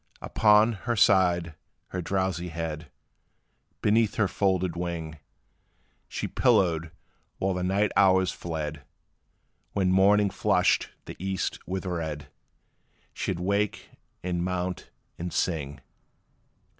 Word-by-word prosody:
Upon 105 +1 +4 0.2
her 120 - +2
side 90 -5 +3 0.4
her 90 - -3
drowsy 95 -1 -1
head, 80 -2 -5 0.9
Beneath 110 0 +3
her 110 -3 +2
folded 95 -3 0
wing, 85 -3 -4 0.9
She - - -4
pillowed, 80 -3 +2 0.5
while 95 0 0
the 90 - -3
night 100 +3 +1
hours 95 -2 +4
fled; 75 -3 -5 0.9
When 95 -2 +1
morning 100 +2 +4
flushed - - +2 0.2
the - - -8
east 95 -1 -2
with 95 +1 -3
red, 80 -5 -4 0.8
She - - -2
'd - - -4
wake, 100 +3 -1 0.3
and 90 -1 -1
mount, 90 0 -3 0.3
and 85 +1 -4
sing. 70 -6 -2
90 Hz, 110 wpm, -27 LUFS, 85-95 Hz, 0.9 s, Upon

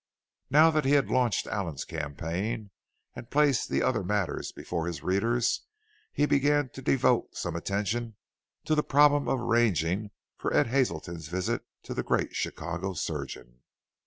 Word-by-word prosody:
Now 155 +3 +6
that 155 -1 +1
he 135 - +2
had 140 -2 +3
launched 125 -4 +2
Allen's 90 -9 -3
campaign 85 +8 -4 0.4
and 120 - -9
placed 145 -2 +2
the - - +1
other - - +1
matters 100 0 -1
before 85 -1 -4
his 85 -2 -5
readers, 115 +6 +1 0.4
he 145 - +2
began 145 -1 +2
to 135 - -10
devote 130 0 +2
some - - -3
attention 105 +6 -2 0.5
to 155 - +1
the 150 - +3
problem 145 0 +4
of 135 - +1
arranging 105 -5 +1 0.3
for - - -2
Ed - - +5
Hazelton's 85 - -1
visit 90 +3 -2 0.2
to - - -6
the - - -1
great - - -1
Chicago 85 +4 -3
surgeon. 70 -7 -5
110 Hz, 150 wpm, -28 LUFS, 85-135 Hz, 0.5 s, Now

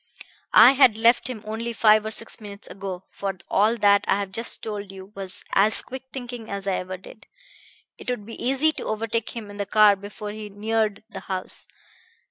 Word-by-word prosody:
I 255 - +10
had 260 -5 +5
left 235 +2 +4
him 225 -4 -6
only 225 +2 -4
five 215 -1 +4
or - - -1
six 220 +1 -3
minutes 205 -1 -10
ago 190 -2 -6
for 195 -2 -4
all 215 +4 +3
that 200 -2 +4
I - - +4
have 200 -1 -3
just 230 +4 -1
told 205 -2 -5
you 190 +1 -11
was 195 -2 -6
as 210 +3 +3
quick 260 +1 -8
thinking 245 -3 -7
as 200 -1 -4
I 195 -2 +1
ever 185 +1 -5
did. 195 +3 -15 0.7
It - - -7
would 245 -5 -3
be 230 - -8
easy 270 +5 +3
to - - -6
overtake 225 +1 -2
him 210 -3 -7
in 205 - -10
the 200 -1 -3
car 210 0 +6
before 205 +1 -8
he 210 0 -7
neared 215 0 -1
the - - -6
house. 185 -1 -5
215 Hz, 200 wpm, -24 LUFS, 200-230 Hz, 0.7 s, I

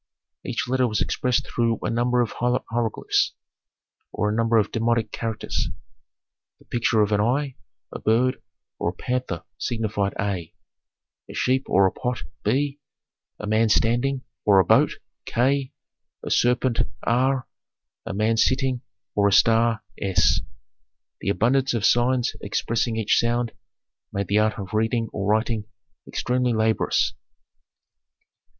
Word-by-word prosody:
Each - - -3
letter 130 0 +2
was 105 -2 -1
expressed 125 -2 0
through 115 -1 0
a 105 - -1
number 120 +1 +2
of 115 - -1
hieroglyphs, 120 -2 0 0.8
or 105 - -1
a - - -1
number 115 0 +2
of 105 -2 +2
demotic 115 -1 0
characters. 115 -2 -3 0.9
The - - -23
picture 115 -2 +2
of 105 - -1
an 105 0 +3
eye, 135 +4 0 0.3
a - - -6
bird, 125 +4 +2 0.4
or - - 0
a - - -5
panther 125 -4 -3 0.2
signified 105 -4 -1
A, 95 -5 -3 0.7
a - - -9
sheep 130 +1 +1
or 95 +1 +4
a 95 - +3
pot 125 0 -3 0.2
B, 140 +1 0 0.6
a - - -5
man 110 +1 +2
standing 120 +5 +2 0.2
or 100 -2 +5
a 95 - +4
boat - - +4 0.3
K, 135 +2 +1 0.5
a - - -4
serpent 125 0 +2 0.2
R, 130 +2 +1 0.6
a - - -5
man 110 +2 +1
sitting 130 +1 +2 0.3
or 100 -1 +3
a - - +2
star 115 +2 +4 0.2
S. 95 -2 +2 0.8
The 100 - -2
abundance 125 +5 +2
of 105 -4 0
signs 120 +2 +2
expressing 115 +3 -1
each 110 -2 +2
sound 120 0 0 0.6
made 100 -2 -3
the 105 +1 +3
art 110 0 +1
of 95 -1 -7
reading 115 +1 0
or 100 -1 -2
writing 110 0 +1 0.4
extremely 125 -1 0
laborious. 110 0 +1
115 Hz, 140 wpm, -24 LUFS, 105-125 Hz, 0.9 s, or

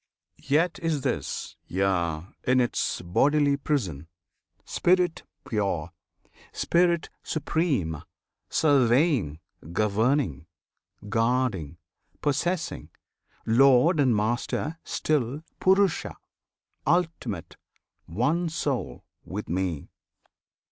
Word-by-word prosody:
[FN#29] - - -18
Yet 165 +5 +2
is 165 -4 -1
this - - -3
Yea! 85 -4 0 0.2
in 130 0 +4
its 120 -6 0
bodily 145 - +3
prison! 100 - -2 0.6
Spirit 180 -2 +2 0.3
pure, 95 -7 -1 0.6
Spirit 170 -1 +1
supreme; 140 - -1 0.5
surveying, 130 - +3 0.3
governing, 105 - +1 0.6
Guarding, 115 - 0 0.4
possessing; 165 +4 -1 0.6
Lord 135 +7 +5
and 130 -5 +4
Master 120 +8 -1
still 145 0 -1 0.2
PURUSHA, 190 -1 +2 0.7
Ultimate, 170 +1 -1 0.5
One 145 - 0
Soul 140 - -3 0.2
with 105 +3 -6
Me. 90 -3 -2
130 Hz, 80 wpm, -26 LUFS, 95-155 Hz, 0.7 s, Lord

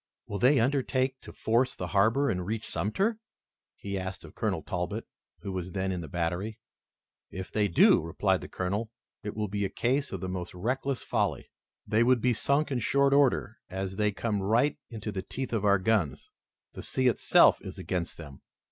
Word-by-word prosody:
"Will 100 - -4
they 130 +2 +5
undertake 130 +1 +1
to - - -10
force 120 +3 +1
the 90 - -5
harbor 110 +9 +3
and 90 0 -2
reach 110 +4 -3
Sumter?" 190 - 0 0.6
he 100 -1 -4
asked 95 0 -6
of - - -13
Colonel 100 -8 -1
Talbot, 90 -4 -3 0.4
who 100 - -5
was 90 -1 -4
then 95 -1 -1
in 90 -2 -3
the 80 - -7
battery. 90 +5 -2 0.7
"If 95 +1 -7
they 105 -1 +2
do," 85 - +5
replied 95 +3 0
the - - -7
Colonel, 100 +5 -2 0.3
"it 105 -3 -5
will 105 -1 -1
be 100 +1 -2
a 95 - 0
case 135 +7 0
of 95 - -4
the 95 - -4
most 90 -1 -5
reckless 130 +7 -1
folly. - - -1 0.3
They 110 +2 +2
would 125 +1 +4
be 125 +2 +2
sunk 140 +6 +1
in 130 - 0
short 140 +4 +3
order, 135 -5 +2
as 95 +1 -4
they 105 -1 +2
come 105 0 -2
right 120 +10 +2
into 110 -2 -5
the 95 -2 -3
teeth 130 +5 -5
of 105 -3 0
our 100 0 +5
guns. 95 -7 0 0.4
The - - -7
sea 130 - -1
itself, 125 -4 +5
is - - -8
against 90 -1 -3
them. 70 -5 -10
105 Hz, 190 wpm, -29 LUFS, 95-125 Hz, 0.7 s, they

